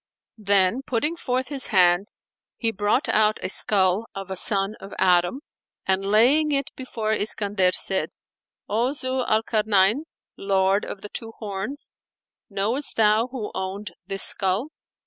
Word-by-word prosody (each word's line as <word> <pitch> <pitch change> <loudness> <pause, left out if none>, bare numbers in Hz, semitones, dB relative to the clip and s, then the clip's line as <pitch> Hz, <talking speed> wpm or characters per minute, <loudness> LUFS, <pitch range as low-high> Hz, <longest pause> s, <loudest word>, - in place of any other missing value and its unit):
Then 200 +3 +2
putting 275 +5 -1
forth 255 -5 -2
his 275 -2 +2
hand 185 -1 +3 0.5
he 230 -2 -1
brought 215 +8 0
out 215 0 +2
a - - -1
skull 195 +1 +2
of 195 -1 -7
a - - -3
son 195 +2 0
of 195 - -10
Adam 180 +8 +2 0.4
and, 190 0 +1
laying 250 +10 +4
it 275 -1 0
before 225 -4 -3
Iskandar, 205 -3 0
said, 190 -1 +2 0.6
"O 235 +6 0
Zu 260 -2 -2
al 220 -1 +1
Karnayn, 215 +4 +2 0.3
Lord 195 0 +1
of 195 - -8
the 210 - -8
Two 225 +1 -7
Horns, 210 +7 -5 0.6
knowest 220 +8 -2
thou 220 +1 +3
who 250 -5 -6
owned 190 +1 -5 0.2
this 195 -1 0
skull?" 200 +7 0
210 Hz, 145 wpm, -23 LUFS, 195-245 Hz, 0.6 s, laying